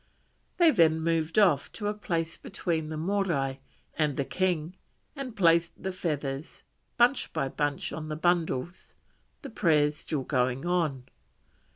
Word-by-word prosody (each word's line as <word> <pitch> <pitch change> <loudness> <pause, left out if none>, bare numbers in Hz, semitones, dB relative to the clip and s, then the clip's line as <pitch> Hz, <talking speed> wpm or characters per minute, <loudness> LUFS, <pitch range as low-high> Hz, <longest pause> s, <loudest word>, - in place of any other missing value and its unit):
They 340 -3 +6
then 160 - +4
moved 165 0 0
off 180 -9 +4
to 210 - -5
a 210 - 0
place 170 -6 -2
between 165 -5 -3
the 155 - -4
Morai 160 -7 0 0.4
and 150 -3 0
the 140 - 0
king 180 0 -1 0.4
and 265 -5 -6
placed 170 -3 +3
the 190 - -1
feathers 150 -5 -4 0.3
bunch 245 +2 +3
by 135 - -1
bunch 145 0 -2
on 155 -1 -5
the 155 - -3
bundles, 170 -2 -1 0.5
the 275 - -7
prayers 150 -7 +2
still 145 -4 -3
going 130 +1 0
on. 165 -7 0
165 Hz, 145 wpm, -28 LUFS, 150-185 Hz, 0.5 s, They